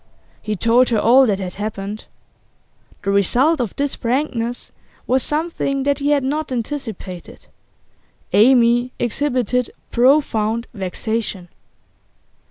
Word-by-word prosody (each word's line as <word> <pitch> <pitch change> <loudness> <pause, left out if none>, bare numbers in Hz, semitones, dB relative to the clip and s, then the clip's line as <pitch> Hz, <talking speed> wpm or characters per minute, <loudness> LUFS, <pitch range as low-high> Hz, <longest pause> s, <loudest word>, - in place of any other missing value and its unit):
He 215 0 -3
told 230 +5 +3
her 230 - +1
all 255 +4 +5
that 200 -3 +1
had 185 -2 -5
happened. 205 0 -5 1.0
The 200 - 0
result 250 - +2
of 230 -6 -4
this 285 0 -1
frankness 245 -1 -2 0.3
was 260 +1 +2
something 295 -3 -1
that 280 0 0
he 285 +1 0
had 290 -2 +2
not 295 +2 -2
anticipated; 230 -7 -6 0.9
Amy 240 +1 +4
exhibited 250 -1 0 0.2
profound 235 -4 +2
vexation. 200 -1 -4
240 Hz, 110 wpm, -19 LUFS, 215-270 Hz, 1.0 s, all